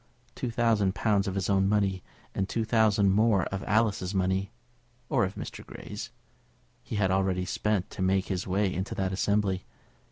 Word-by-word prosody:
Two 125 - -3
thousand 110 -4 +2
pounds 100 -3 +1
of 95 - -2
his 95 -1 -1
own 95 -1 +3
money, 100 -3 +1 0.3
and 95 0 -1
two 115 -1 -1
thousand 110 -3 +3
more 105 -2 +3
of 95 - -3
Alice's 105 -3 +1
money, 95 +1 +1 0.6
or 125 -7 +3
of 95 - -6
Mr. - - -7
Grey's, - - -8 0.7
he - - -6
had 95 -3 +2
already 95 -1 +1
spent 100 +1 -1
to - - -6
make 95 0 +2
his 95 -2 -3
way 95 0 +1
into 95 +2 -3
that 95 -1 -1
assembly. 100 -1 +1
100 Hz, 170 wpm, -28 LUFS, 95-105 Hz, 0.7 s, own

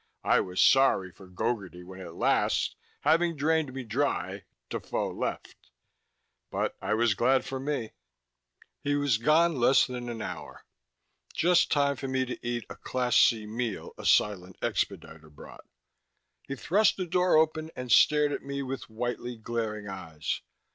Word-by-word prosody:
I - - +4
was 90 0 -3
sorry 135 -9 +4
for 95 +2 -15
Gogarty 90 -2 -3
when 95 +1 -10
at 85 -2 -9
last, - - +1 0.3
having 165 +3 +3
drained 155 -1 +1
me 135 0 -6
dry, 100 -6 -2 0.2
Defoe - - -3
left. - - -5 0.8
But - - -2
I - - 0
was 115 -1 +3
glad 130 +6 +2
for 135 - -4
me. 135 -5 -3 0.9
He 145 0 +1
was 145 -6 +1
gone 155 +5 +3
less 130 +2 +5
than 125 -1 -6
an 115 -1 -5
hour - - -8 0.7
just 175 +1 +3
time 140 -1 +2
for 135 - -5
me 130 0 0
to 125 - -7
eat 120 -2 -3
a - - -10
Class 125 -1 -1
C 110 -3 +5
meal 110 0 -4
a - - -10
silent 95 -3 +2
expediter 80 -1 -3
brought. 75 - -13 0.8
He 140 - -4
thrust 195 - +2
the 185 - -2
door 180 -1 +3
open 155 0 +1
and 125 -1 -5
stared 150 +5 +5
at - - -3
me 140 0 -4
with 135 -1 -6
whitely 120 +1 -4
glaring 110 -2 -4
eyes. 80 -6 -4
125 Hz, 155 wpm, -28 LUFS, 105-145 Hz, 0.9 s, less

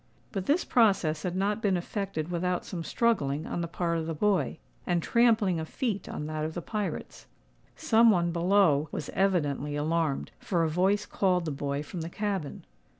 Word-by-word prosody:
But 195 -3 -4
this 310 +6 +2
process 190 -10 +3
had 180 +1 -3
not 205 +3 0
been 195 -4 +2
effected 180 -3 -4
without 180 +1 -1
some 170 -4 -5
struggling 160 - 0
on 175 - -3
the 170 - -2
part 170 0 -1
of 160 - -4
the 165 - -3
boy, 200 +3 +1 0.3
and 175 - +2
trampling 220 -7 +3
of 160 - -5
feet 220 -6 -2
on 150 - -4
that 155 0 -3
of 155 +1 -4
the 175 - -3
pirates. 205 -7 -4 0.5
Some 230 +1 +4
one 175 -4 +2
below 170 -4 +3
was 145 - -5
evidently 150 -7 0
alarmed, 155 -1 -1
for 175 -6 0
a 160 - +1
voice 190 +5 +2
called 180 -3 +1
the 155 - -2
boy 140 +1 -3
from 170 +3 -6
the 165 - -4
cabin. 195 -6 -3
175 Hz, 185 wpm, -28 LUFS, 155-200 Hz, 0.5 s, Some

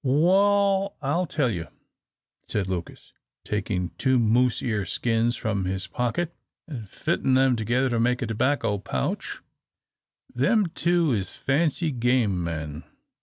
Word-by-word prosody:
"Wal, 195 +7 +3
I'll 170 +6 0
tell 145 -6 0
you," 85 -5 -4 0.8
said 100 -2 -1
Lucas, 90 -3 -6 0.3
taking 95 -4 -2
two 130 -1 +3
moose 120 +2 +3
ear 110 -4 0
skins 115 +6 0
from 100 -5 -2
his 95 +1 -2
pocket, 125 - -2 0.3
and 120 -10 -7
fitting 130 - 0
them 130 -1 +4
together 120 +4 +1
to 120 - +1
make 125 +2 +1
a - - 0
tobacco 115 -2 0
pouch, 65 -9 -3 0.9
"them 195 - +3
two 170 -4 +2
is 100 -6 -2
fancy 155 +3 0
game 120 -7 +1
men. 80 -2 -4
120 Hz, 130 wpm, -25 LUFS, 100-145 Hz, 0.9 s, them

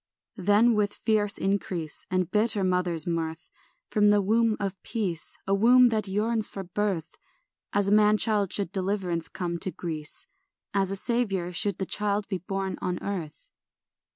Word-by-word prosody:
Then 205 +5 +4
with 210 -1 0
fierce 210 -2 +1
increase 185 -5 -2
And 185 -2 0
bitter 210 -1 +3
mother's 180 -3 0
mirth, 165 -1 -3 0.4
From 210 -2 +4
the 205 0 +5
womb 220 +2 +2
of 195 -2 -4
peace, 190 -8 -3
A 195 - +1
womb 245 +5 +6
that 215 -3 0
yearns 215 +3 0
for 195 - -6
birth, 185 -2 -3 0.5
As 205 -1 +1
a - - +1
man 210 0 +5
child 210 -4 +1
should 200 -4 0
deliverance 185 -4 -1
come 170 -2 -4
to 185 - -1
Greece, 165 - -5 0.5
As 195 -2 +1
a 195 - -1
saviour 195 -5 0
should 200 +1 -1
the 190 - -2
child 205 +1 -1
be 190 -3 -2
born 195 +2 -4
on 180 -1 -1
earth. 170 -7 -6
195 Hz, 160 wpm, -27 LUFS, 180-210 Hz, 0.5 s, womb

